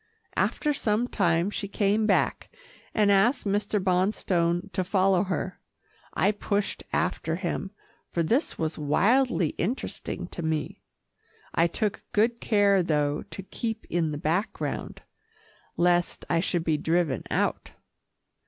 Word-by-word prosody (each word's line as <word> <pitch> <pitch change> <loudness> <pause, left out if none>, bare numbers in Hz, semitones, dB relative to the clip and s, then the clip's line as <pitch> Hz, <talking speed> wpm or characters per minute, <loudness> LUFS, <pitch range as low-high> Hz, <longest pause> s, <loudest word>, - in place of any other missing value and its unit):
After 300 -1 +1
some 225 -2 +1
time 175 -3 +1
she 200 - -3
came 210 +2 +1
back, - - +1 0.4
and 210 -1 +3
asked 225 +7 +3
Mr. 205 +1 0
Bonstone 180 -1 +1
to 185 - 0
follow 190 0 +2
her. 185 0 -3 0.6
I 205 - +3
pushed 205 -1 -2
after 165 -2 0
him, 180 +1 -3 0.4
for 170 - 0
this 240 - +1
was 160 -1 -2
wildly 200 - +2
interesting 230 +10 -2
to - - -6
me. 160 -2 -2 0.7
I 165 - +4
took 205 +4 -2
good 230 +3 +2
care, 200 -3 +4
though, 150 -3 0
to 195 - -7
keep 225 +3 -4
in 165 -3 +1
the 145 - -3
background, 170 +8 -2 0.7
lest 175 0 +2
I 170 - +2
should 175 -1 0
be 160 -2 +1
driven 160 -4 +1
out. - - -1
185 Hz, 130 wpm, -27 LUFS, 170-210 Hz, 0.7 s, I